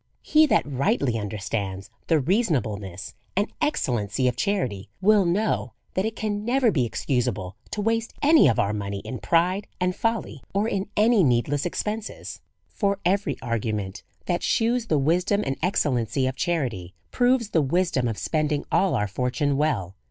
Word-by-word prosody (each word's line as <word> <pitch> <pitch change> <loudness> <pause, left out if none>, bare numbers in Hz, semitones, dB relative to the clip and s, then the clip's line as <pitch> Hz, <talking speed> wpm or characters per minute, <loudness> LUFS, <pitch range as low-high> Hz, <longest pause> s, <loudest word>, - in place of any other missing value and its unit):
He 310 0 +5
that - - +3
rightly 140 - 0
understands 100 -2 -4 0.2
the 160 -2 +3
reasonableness 125 - -1 0.2
and 205 +3 0
excellency 125 - 0
of 125 - 0
charity, 120 - -1
will 205 0 +4
know 200 +6 0 0.2
that 190 - 0
it 220 0 -2
can 210 -1 -2
never 245 0 +3
be 130 -9 +1
excusable 115 -6 -2
to 210 - -3
waste 225 +1 0
any 300 - +6
of 115 - +2
our 100 +1 +1
money 100 -1 -4
in 130 - -6
pride 180 +4 +1
and 180 0 0
folly, 225 - -2
or 205 +2 +2
in 200 -3 -2
any 215 -1 +5
needless 135 +4 +1
expenses. 210 +4 -5 0.3
For 200 -2 -1
every 185 -5 +1
argument 110 -5 -2 0.2
that 175 -1 0
shews 235 +1 +1
the 155 - +2
wisdom 180 +8 +2
and 135 - -1
ex 185 - +2
cellency 125 -1 0
of 130 - -2
charity, 125 - -2 0.2
proves 245 -3 +2
the 160 - +3
wisdom 145 -3 +1
of 115 -2 -3
spending 150 -2 -1
all 195 - +3
our 105 - 0
fortune 130 - -1
well. 135 - 0
150 Hz, 160 wpm, -25 LUFS, -, 0.3 s, any